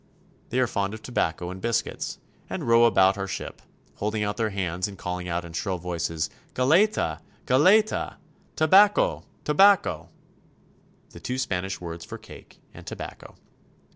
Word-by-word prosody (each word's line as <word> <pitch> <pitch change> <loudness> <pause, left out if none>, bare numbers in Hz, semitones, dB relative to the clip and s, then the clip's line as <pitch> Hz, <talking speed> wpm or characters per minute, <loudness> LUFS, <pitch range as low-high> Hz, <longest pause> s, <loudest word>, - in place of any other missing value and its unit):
They 125 - 0
are 130 - +4
fond 100 -2 -2
of 110 - -12
tobacco 90 -7 -2
and 95 0 -8
biscuits, 115 +1 -2 0.3
and - - -4
row 115 0 +6
about 95 -3 +4
our 95 - -2
ship, 95 - -6 0.4
holding 105 +1 -1
out 105 0 -2
their 110 -2 0
hands 95 -2 -2
and 100 -2 -10
calling 90 0 -4
out 85 0 -2
in 85 - -10
shrill 95 +2 -2
voices, 85 -2 -2 0.3
''Galleta! 155 - +2 0.3
Galleta! 190 +12 +3
" - - -33
" - - -36
Tabaco! 195 +6 +4 0.2
Tabaco! 195 +6 +4 0.5
" - - -34
the - - -10
two 125 - -4
Spanish 95 -6 -2
words 85 -1 -7
for - - -8
cake - - -15
and - - -13
tobacco. - - -8
100 Hz, 160 wpm, -25 LUFS, 90-130 Hz, 0.5 s, row